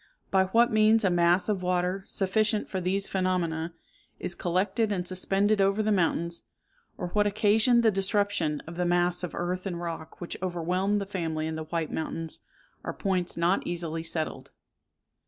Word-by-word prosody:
By 190 -1 +4
what 230 +5 +3
means 215 +1 +4
a 190 - +3
mass 175 +1 +3
of 205 -3 0
water, 180 +1 0
sufficient 210 +2 0
for 190 - -3
these 190 +2 0
phenomena, 170 -3 -1 0.4
is 180 - -2
collected 190 +5 0
and 180 -3 -2
suspended 195 +3 +1
over 195 +2 +2
the 215 - +1
mountains, 170 -2 0 0.6
or 180 - -4
what 205 +3 +2
occasioned 215 +3 +4
the 220 - +5
disruption 195 -5 +1
of 165 +1 -9
the 180 - 0
mass 175 0 +2
of 180 - -5
earth 180 +2 -2
and 175 -3 -4
rock 165 -2 -6
which 175 - -5
overwhelmed 185 +3 0
the 200 - -3
family 165 -5 -3
in 160 - -3
the 160 0 -5
White 165 -1 -3
Mountains, 160 0 -4 0.4
are - - -4
points 185 -4 -1
not 175 +3 +2
easily 165 -2 -3
settled. 160 -1 -4
185 Hz, 170 wpm, -28 LUFS, 170-200 Hz, 0.6 s, the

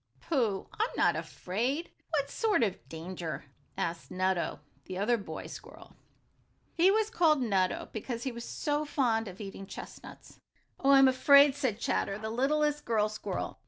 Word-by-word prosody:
"Pooh, 225 - 0
I'm 445 +3 +2
not - - +3
afraid! 250 - -3 0.2
What 285 -3 -1
sort 435 - +2
of 200 -5 -3
danger?" 165 -1 -6 0.3
asked 170 0 -3
Nutto, 185 -3 -1 0.3
the 185 - -6
other 215 +5 +2
boy 205 -4 -6
squirrel. - - -11 0.8
He 345 +3 +5
was 435 +2 +2
called 320 - +4
Nutto 195 -7 0
because 230 +2 -4
he 265 - -2
was 235 0 -7
so 295 +3 -1
fond 240 -7 0
of 190 0 -9
eating 195 -1 -7
chestnuts. - - -11 0.4
"Oh, 275 - +1
I'm 270 -1 +8
afraid," 280 +2 +6
said 260 -7 -1
Chatter, 200 -3 -1
the 220 +1 -5
littlest 295 +4 +1
girl 215 -2 +1
squirrel. 215 +1 -5
235 Hz, 155 wpm, -30 LUFS, 195-290 Hz, 0.8 s, I'm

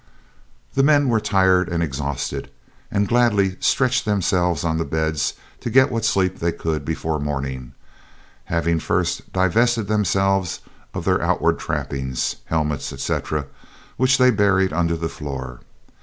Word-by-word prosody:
The 135 - +2
men 145 -1 +4
were 115 -2 +3
tired 95 -3 +3
and 85 -1 0
exhausted, 70 -3 -3 0.4
and 100 0 0
gladly 105 -5 +2
stretched 125 -1 +2
themselves 90 -5 +1
on 80 -1 0
the - - +1
beds 80 -3 -1 0.2
to - - -4
get 130 +2 +4
what 115 -2 -1
sleep 95 -4 +1
they 85 0 +1
could 80 -3 -3
before 80 0 -2
morning, 70 -3 -4 0.7
having 85 0 0
first - - -1
divested 110 +4 +2
themselves 95 -3 +1 0.3
of - - -4
their - - +2
outward - - +1
trappings, 65 -2 -3
helmets, 75 -3 -1
etc., 75 -2 -2 0.5
which 130 +2 +3
they 125 -1 +5
buried 100 -4 +2
under 85 0 +1
the 80 0 -2
floor. 65 -6 -6
90 Hz, 140 wpm, -21 LUFS, 75-105 Hz, 0.7 s, they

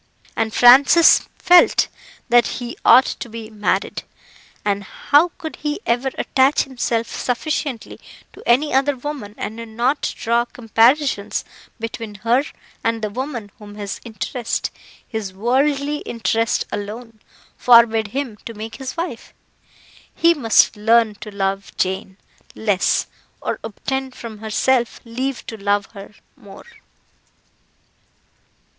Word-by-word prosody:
And 225 -1 -1
Francis 270 +8 +6
felt 355 -1 +5 0.4
that 240 0 +4
he 240 -1 -6
ought 260 - +7
to 240 - -5
be 225 0 -8
married; 205 -2 -1 0.6
and 200 -1 0
how 290 - +2
could 315 - -7
he 300 +2 -3
ever 245 +3 +1
attach 270 +2 +2
himself 240 -3 -2
sufficiently 255 +1 -3 0.3
to - - -13
any 275 +6 +3
other 275 +2 +2
woman 250 -6 -7
and 220 - -5 0.2
not 255 +5 +1
draw 235 +1 +1
comparisons 240 0 +1 0.3
between 225 -1 -6
her 245 +4 +3 0.4
and 225 -1 -1
the 210 - -2
woman 245 -3 -5
whom 205 -1 -11
his 205 -1 -6
interest 230 +2 -3 0.4
his 210 -5 -5
worldly 280 +6 +1
interest 230 -3 -1
alone 220 +2 -6 0.4
forbade 230 -2 +5
him 255 -1 -4
to 230 - -8
make 220 +1 -7
his 265 +2 -7
wife? 330 -9 -5 0.8
He 335 +1 +4
must 230 -7 +3
learn 225 +1 +3
to - - -7
love 195 -1 -3
Jane 190 0 -2 0.4
less, 205 -4 +1 0.3
or - - -3
obtain 265 +5 -4
from 230 -4 -10
herself 235 +3 0
leave 255 +3 -4
to 225 - -7
love 205 0 0
her 200 0 -11 0.2
more. 195 -1 -14
230 Hz, 125 wpm, -20 LUFS, 215-265 Hz, 0.8 s, ought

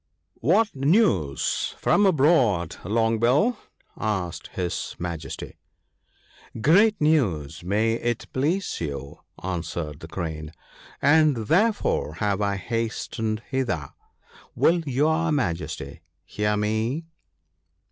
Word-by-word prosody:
1 155 +10 +3
What 220 -6 +1
news 135 - +1
from 205 - +3
abroad, 130 - +3
Long 115 +3 +1
bill? 145 - +3 0.2
' - - -43
asked 95 -5 -2
his 90 -2 -3
Majesty. 85 -2 -6 0.5
' - - -16
Great 200 - +4
news, 95 - +1
may 105 +5 +1
it 120 0 -2
please 160 - -1
you/ 70 -3 -5 0.2
answered 85 -4 -4
the 80 - -9
Crane, 80 -3 -5 0.3
* - - -22
and 150 -1 +5
therefore 170 - +1
have 100 +2 0
I 100 -1 +1
hastened 110 +1 -3
hither. 120 - -2 0.7
Will 170 +2 +4
your 160 +5 +2
Majesty 80 - -2 0.2
hear 105 0 -1
me 110 +9 -1
110 Hz, 110 wpm, -25 LUFS, -, 0.7 s, and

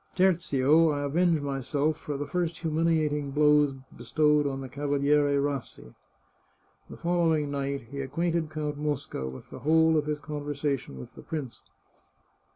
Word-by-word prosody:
Tertio, 165 -4 +3
I 145 -1 -1
avenge 165 +2 +2
myself 140 +2 -1
for 145 -2 -5
the 145 - -3
first 170 +1 -2
humiliating 155 -3 0
blows 150 -1 +4 0.2
bestowed 150 +5 +2
on 135 -1 -3
the 135 - -6
Cavaliere 145 +1 +1
Rassi." 140 - -4 1.0
The - - -9
following 165 -4 +1
night, 140 -1 -2
he 140 0 -4
acquainted 165 +4 -1
Count 150 -1 -4
Mosca 145 - -3
with 65 - -11
the - - -8
whole 160 +1 +4
of 150 -1 0
his 150 -1 -1
conversation 145 - -4
with - - -10
the - - -12
prince. 145 -7 -6
150 Hz, 145 wpm, -28 LUFS, 140-155 Hz, 1.0 s, blows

